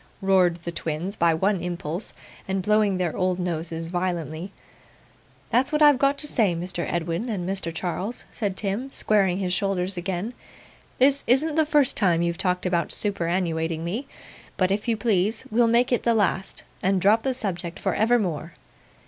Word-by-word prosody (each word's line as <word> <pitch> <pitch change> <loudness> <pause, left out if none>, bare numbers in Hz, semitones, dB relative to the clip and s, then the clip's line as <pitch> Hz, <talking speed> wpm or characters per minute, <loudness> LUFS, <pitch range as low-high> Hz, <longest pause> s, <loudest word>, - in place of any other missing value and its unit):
roared 190 -3 +3
the 170 - -4
twins 170 +4 -3
by 170 -5 +3
one 190 +4 +1
impulse, 175 +1 -4 0.4
and 190 0 -1
blowing 210 -1 +2
their 175 -3 -1
old 185 -1 0
noses 165 -2 -3
violently. 175 -1 -3 1.0
'That's 260 +5 +2
what 300 0 +3
I've 290 -3 +6
got 275 +1 +2
to 295 - -3
say, 210 -11 +2
Mr. 175 0 -4
Edwin 170 +7 -2
and 185 -5 -3
Mr. 190 -3 -2
Charles,' 185 +7 -4
said 200 -4 -3
Tim, 220 +7 -3
squaring 195 -7 +2
his 185 -2 -1
shoulders 190 -1 -1
again. 185 +5 -3 0.6
'This 275 +2 +4
isn't 290 +6 +3
the 315 0 +2
first 295 -4 +3
time 175 -5 +2
you've 170 0 -1
talked 180 -1 0
about 175 -2 0
superannuating 170 -4 0
me; 210 +12 -3 0.5
but, 185 0 +2
if 205 +4 -1
you 230 -2 +1
please, 210 0 0
we'll 235 +1 +4
make 240 +3 +3
it 245 - +2
the 235 -1 +2
last, 190 -2 0 0.2
and 190 0 +2
drop 210 +5 +4
the 260 0 -1
subject 175 -7 -4
for 190 - -1
evermore. 190 -9 +1
190 Hz, 170 wpm, -24 LUFS, 175-220 Hz, 1.0 s, I've